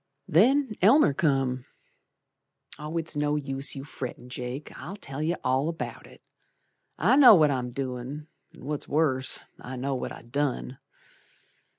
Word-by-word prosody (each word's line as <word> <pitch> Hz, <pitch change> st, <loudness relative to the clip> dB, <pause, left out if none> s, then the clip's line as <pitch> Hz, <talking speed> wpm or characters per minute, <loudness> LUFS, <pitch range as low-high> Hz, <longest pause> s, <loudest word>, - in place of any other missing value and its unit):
Then 255 Hz, -, +4 dB
Elmer 220 Hz, -, +6 dB
come. 135 Hz, -4 st, 0 dB, 1.1 s
It's 160 Hz, +2 st, -4 dB
no 145 Hz, 0 st, +1 dB
use 135 Hz, -1 st, -1 dB
your 135 Hz, 0 st, -7 dB
frettin', 125 Hz, -3 st, -7 dB
Jake, 125 Hz, +3 st, -6 dB
I'll 190 Hz, -, -7 dB
tell 140 Hz, -8 st, -7 dB
you 165 Hz, +3 st, 0 dB
all 130 Hz, +4 st, +1 dB
about 165 Hz, -, -6 dB
it. -, -, -18 dB, 0.7 s
I -, -, +4 dB
know 270 Hz, -6 st, +9 dB
what 155 Hz, -4 st, +4 dB
I'm 125 Hz, -2 st, -2 dB
doin', 130 Hz, +3 st, -5 dB, 0.3 s
An' -, -, -14 dB
what's 150 Hz, 0 st, -4 dB
worse, 140 Hz, -4 st, +1 dB, 0.2 s
I 130 Hz, -, -7 dB
know 135 Hz, +2 st, -2 dB
what 130 Hz, -, -3 dB
I -, -, -10 dB
done. 130 Hz, 0 st, -2 dB
140 Hz, 145 wpm, -27 LUFS, 130-160 Hz, 1.1 s, know